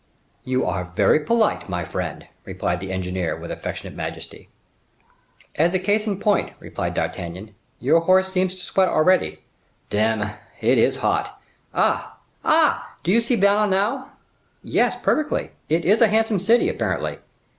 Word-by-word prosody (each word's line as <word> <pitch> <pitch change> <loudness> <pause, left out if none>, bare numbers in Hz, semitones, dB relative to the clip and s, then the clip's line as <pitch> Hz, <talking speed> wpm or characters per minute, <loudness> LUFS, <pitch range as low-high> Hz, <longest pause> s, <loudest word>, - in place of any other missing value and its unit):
"You 130 0 0
are 90 -1 -3
very 100 +8 +4
polite, 220 - +1
my 90 0 -2
friend," 90 -3 -5 0.2
replied 90 - -2
the 95 +1 -6
engineer, 90 -2 -2
with - - -8
affectionate - - -6
majesty. - - -7 1.1
"As 170 +4 +3
a - - +5
case 205 +4 +1
in 200 -2 -2
point," 205 -1 +1
replied - - -4
D'Artagnan, 90 +5 -4 0.3
"your 145 +6 +4
horse 185 +3 +3
seems 185 0 0
to 185 - -9
sweat 190 -2 +2
already." 180 +4 +2 0.5
"Dame! 105 0 +1 0.3
It - - +3
is - - +3
hot! - - -1 0.3
Ah, - - 0 0.3
ah! - - +2
do 175 - +1
you 230 +4 +4
see 235 +2 +1
Vannes 205 0 +3
now?" 220 +8 0 0.5
"Yes, - - +1
perfectly. 305 -1 0 0.2
It 165 +2 +1
is 205 +6 +4
a 230 - +8
handsome 220 -1 +2
city, 230 - +3
apparently." 445 - -2
185 Hz, 150 wpm, -22 LUFS, -, 1.1 s, a